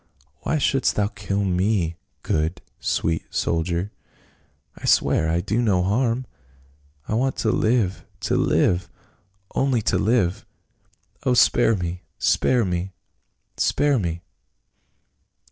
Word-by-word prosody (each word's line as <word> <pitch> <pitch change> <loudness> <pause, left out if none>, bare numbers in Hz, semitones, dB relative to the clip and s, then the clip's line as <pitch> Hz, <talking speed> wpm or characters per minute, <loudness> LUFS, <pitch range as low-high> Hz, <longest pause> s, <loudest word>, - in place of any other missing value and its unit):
" 70 +1 -40
Why 160 - 0
shouldst 135 -2 +1
thou 105 0 +1
kill 100 -2 -2
me, 90 -2 +1 0.3
good, 80 +3 -1 0.2
sweet 80 0 -1
soldier? 85 +4 -1 0.8
I - - -9
swear 80 - +3
I 85 +1 +1
do 110 +7 0
no 95 -6 +2
harm! 115 +5 0 0.8
I - - -2
want 130 +4 +1
to 110 - 0
live 110 -5 +1
— - - -35
^to - - 0
live 90 -1 +2 0.3
— 95 +1 -32
only 130 -5 +1
to - - +1
live! 100 -4 +1 0.8
Oh, 125 -2 +2
spare 120 -2 +4
me 90 -1 -4
— - - -50 0.2
spare 125 -4 +2
me 90 +1 -3 0.3
— - - -49
spare 145 -3 +2
me 85 -2 -3
95 Hz, 135 wpm, -23 LUFS, 85-115 Hz, 0.8 s, spare